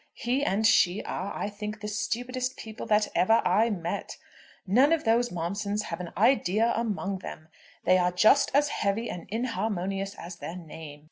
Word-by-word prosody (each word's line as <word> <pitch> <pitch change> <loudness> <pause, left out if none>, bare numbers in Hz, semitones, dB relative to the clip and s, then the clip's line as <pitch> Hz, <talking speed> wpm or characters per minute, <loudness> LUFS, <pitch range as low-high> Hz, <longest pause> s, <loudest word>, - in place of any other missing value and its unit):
He 260 +3 -1
and 215 -2 +1
she 200 -3 +4
are, 195 +2 -4
I - - -2
think, 210 +1 -6
the 210 - -6
stupidest 245 +5 -2
people 220 0 -8
that 210 0 +3
ever 225 +5 +4
I 210 +6 +3
met. 185 -1 -4 0.5
None 250 - +4
of 330 - 0
those 235 +2 +2
Momsons 200 +5 -2
have 165 - -5
an 175 -2 -6
idea 225 0 +3
among 200 -4 -2
them. 155 -3 -9 0.4
They 185 - +5
are 180 0 +2
just 215 +10 +5
as 290 +1 +4
heavy 200 +4 -1
and 170 - -8
inharmonious 195 -4 -2
as 170 0 -9
their 170 - -6
name. 160 -3 -9
205 Hz, 175 wpm, -27 LUFS, 185-230 Hz, 0.5 s, They